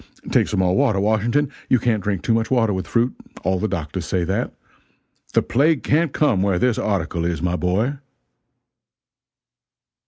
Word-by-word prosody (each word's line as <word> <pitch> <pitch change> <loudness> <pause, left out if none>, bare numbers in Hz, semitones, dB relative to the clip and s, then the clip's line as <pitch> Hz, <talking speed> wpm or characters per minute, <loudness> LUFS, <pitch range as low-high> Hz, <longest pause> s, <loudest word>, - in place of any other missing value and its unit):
Take - - +3
some - - 0
more 90 0 +2
water, 125 -8 +2
Washington 115 +8 +1 0.2
you 130 - +5
can't 115 -3 0
drink 100 -3 -2
too 115 - +2
much 115 0 0
water 115 -5 +2
with 95 -3 -3
fruit 120 +6 +1 0.3
all 95 +1 +1
the 110 - 0
doctors 85 -3 -4
say 90 +1 0
that. 95 +4 -1 0.8
The - - +4
plague 140 0 +2
can't 160 +1 +2
come 130 -12 +2
where 95 -2 +1
this 120 +4 +1
article 85 -5 -1
is, 85 -2 -1
my 90 +1 -1
boy!" 105 +11 0
105 Hz, 165 wpm, -21 LUFS, 90-125 Hz, 0.8 s, you